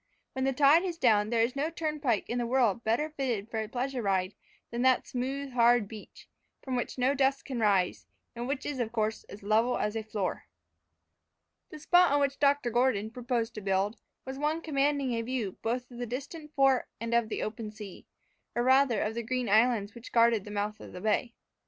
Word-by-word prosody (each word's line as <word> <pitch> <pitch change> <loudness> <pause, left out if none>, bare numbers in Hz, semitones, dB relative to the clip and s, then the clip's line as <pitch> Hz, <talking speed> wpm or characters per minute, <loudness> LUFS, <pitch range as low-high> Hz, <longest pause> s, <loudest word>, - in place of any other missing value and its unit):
When 260 0 -1
the 270 - +2
tide 285 +5 +5
is 350 -3 -3
down 215 -7 +3
there 230 -1 +2
is 240 +3 -1
no 290 +3 0
turnpike 300 - -1
in 245 - -2
the 240 - -1
world 235 -3 +2
better 245 +8 0
fitted 245 -8 -3
for 225 - -2
a 215 - -5
pleasure 255 +1 -2
ride 190 -2 0 0.4
than 235 +1 -2
that 260 0 +3
smooth 270 +2 -4
hard 240 -3 +4
beach, 215 -1 -12 0.4
from 260 -2 -3
which 245 - -3
no 255 +2 +2
dust 275 0 +1
can 255 -3 -4
rise, 195 -5 +1 0.3
and 240 +1 -4
which 275 0 -3
is 285 -3 -3
of 230 -2 -1
course 220 -1 -2
as 200 - -12
level 220 +4 +2
as 210 +1 -1
a 225 - -1
floor. 215 -3 -4 1.2
The - - -9
spot 355 +3 +4
on 285 - +3
which 280 -1 0
Dr. 280 -3 +2
Gordon 225 -3 +1
proposed 240 -1 -2
to 215 - -7
build, 195 +3 0 0.3
was 265 +1 -6
one 305 +3 0
commanding 280 -3 +1
a 230 - -1
view 230 -5 -3
both 245 +2 -2
of 240 - -10
the 245 - -3
distant 290 +5 -7
fort 270 -2 +3
and 230 0 -3
of 235 -2 +2
the - - -3
open 215 0 -5
sea, 210 -3 -11 0.5
or 240 - +1
rather 260 -3 +4
of 215 - -2
the 235 - -3
green 250 +1 -2
islands 220 -1 +3
which 235 0 -11
guarded 230 -3 +3
the - - -8
mouth 210 +1 -3
of - - -11
the 180 - -8
bay. 220 +3 0
240 Hz, 210 wpm, -29 LUFS, 220-270 Hz, 1.2 s, tide